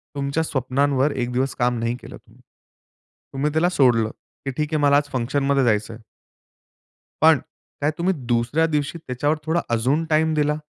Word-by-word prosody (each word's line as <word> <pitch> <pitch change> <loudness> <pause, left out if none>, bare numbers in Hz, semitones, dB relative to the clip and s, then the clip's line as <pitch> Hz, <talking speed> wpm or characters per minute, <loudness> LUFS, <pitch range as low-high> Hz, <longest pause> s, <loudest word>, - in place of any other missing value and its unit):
तुमच्या 140 +3 -1
स्वप्नांवर 140 0 +1
एक 125 -2 -3
दिवस 130 +2 -1
काम 120 -1 0
नाही 115 +1 -1
केलं - - -10
तुम्ही, - - -23 0.9
तुम्ही 145 +3 -1
त्याला 165 +3 +2
सोडलं, 120 -9 +3 0.4
की 135 - -1
ठीक 150 +1 -2
आहे 155 - +1
मला 140 0 +5
आज 145 0 -1
फंक्शनमध्ये 135 +2 +1
जायचं 110 -1 +1
आहे. 115 - -12 1.2
पण - - +7 0.4
काय 145 - +2
तुम्ही 185 +3 +1
दुसऱ्या 120 +7 +1
दिवशी 150 +1 -2
त्याच्यावर 145 +1 -1
थोडा 165 +2 +1
अजून 130 +8 +1
टाईम 155 +1 +2
दिला? 150 0 +1
140 Hz, 165 wpm, -22 LUFS, 125-150 Hz, 1.2 s, पण